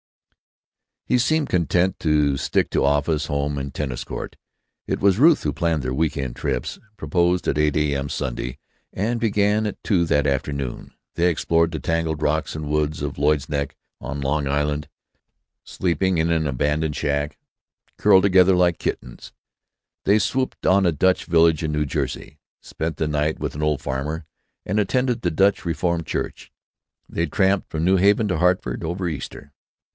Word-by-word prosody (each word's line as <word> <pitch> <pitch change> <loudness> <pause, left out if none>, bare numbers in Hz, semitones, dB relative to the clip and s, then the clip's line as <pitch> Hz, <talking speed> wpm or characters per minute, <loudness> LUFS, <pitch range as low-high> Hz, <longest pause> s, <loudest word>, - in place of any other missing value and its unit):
He 125 - +2
seemed 155 +4 +1
content 90 +1 +1
to 75 -3 +2
stick 70 - 0
to - - +1
office, 75 +2 +1
home, 70 -1 -1
and 70 0 -4
tennis 65 -3 -4
court. - - -6 0.5
It - - -1
was 100 +1 +3
Ruth 155 +3 +5
who 75 - 0
planned 80 -4 0
their 65 0 -2
week 80 +3 0
end 65 -3 -4
trips, 65 -3 -3 0.2
proposed 85 +1 0
at 70 - +1
8 75 -1 +2
a.m. 70 -2 0
Saturday, 60 0 -4 0.4
and 115 +5 -1
begun 105 -1 +1
at 105 - -7
two 90 -6 +2
that 75 -2 +1
afternoon. 70 -2 -3 0.2
They 85 +1 +3
explored 85 +1 +1
the 80 - -4
tangled 80 -2 -1
rocks 80 +1 0
and 75 -1 -5
woods 75 0 0
of 70 -1 -4
Lloyd's 75 -1 +1
Neck, 70 -2 -2 0.2
on 70 +2 -5
Long 70 +1 0
Island, 75 +1 -1 0.8
sleeping 90 +1 0
in 80 +1 +1
an 80 -2 +1
abandoned 75 +3 -1
shack, 70 0 -1 0.6
curled 95 -2 +5
together 95 -1 +5
like 90 -2 +2
kittens. - - -5 0.7
They 100 +2 +5
swooped 130 +4 -1
on 95 +1 +4
a 85 - +3
Dutch 95 +5 +2
village 80 -2 +3
in 75 -1 -2
New 75 0 0
Jersey, 75 +1 -4 0.2
spent 80 +1 -4
the 80 - -1
night 75 +1 0
with - - -4
an 75 - -5
old 75 -3 0
farmer, 75 +4 -3 0.4
and 105 +3 0
attended 125 +4 0
the 90 - +1
Dutch 95 +5 +2
Reformed 85 0 -1
church. - - -4 0.6
They 85 - -2
tramped 95 +5 +1
from 80 0 -3
New 95 +2 +4
Haven 100 +3 +3
to 90 - 0
Hartford, 90 -8 +1
over 90 +3 -2
Easter. 75 -5 -7
80 Hz, 170 wpm, -22 LUFS, 75-90 Hz, 0.8 s, Ruth